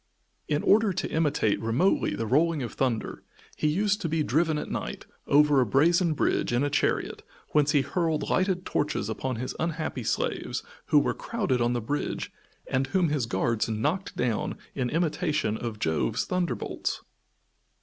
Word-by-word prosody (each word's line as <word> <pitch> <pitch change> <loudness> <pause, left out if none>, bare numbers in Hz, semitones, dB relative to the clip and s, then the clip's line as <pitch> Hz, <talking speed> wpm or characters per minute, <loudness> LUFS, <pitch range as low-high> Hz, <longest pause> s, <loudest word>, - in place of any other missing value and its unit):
In 150 0 0
order 215 0 +4
to 185 - -3
imitate 150 -9 +1
remotely 115 +12 +1
the 115 - -2
rolling 150 +4 +2
of 120 - -5
thunder, 125 -5 -1 0.3
he - - 0
used 205 +6 +1
to 165 - -2
be 160 0 +1
driven 155 +3 +1
at - - -5
night, - - -4 0.2
over 145 -1 +5
a - - +3
brazen 165 - +3
bridge, - - +1
in 120 +3 +2
a 145 - 0
chariot, 145 - 0 0.3
whence 150 0 +3
he 145 - +5
hurled 160 +1 -1
lighted 185 -1 +1
torches 145 -7 -1
upon 130 +3 -2
his 125 +3 -4
unhappy 160 -6 -2
slaves - - -2 0.2
who 150 - +4
were 145 - +3
crowded 200 - -1
on 120 +1 +2
the 120 - -1
bridge 145 +7 -3 0.3
and 130 +1 0
whom 175 +3 +2
his 145 -6 0
guards 115 +3 0
knocked 150 - -2
down 115 -3 -1 0.2
in 125 -3 -1
imitation 155 - 0
of 115 -1 -4
Jove's 80 -6 0
thunder 180 -2 0
bolts. - - -4
150 Hz, 170 wpm, -27 LUFS, 120-165 Hz, 0.3 s, over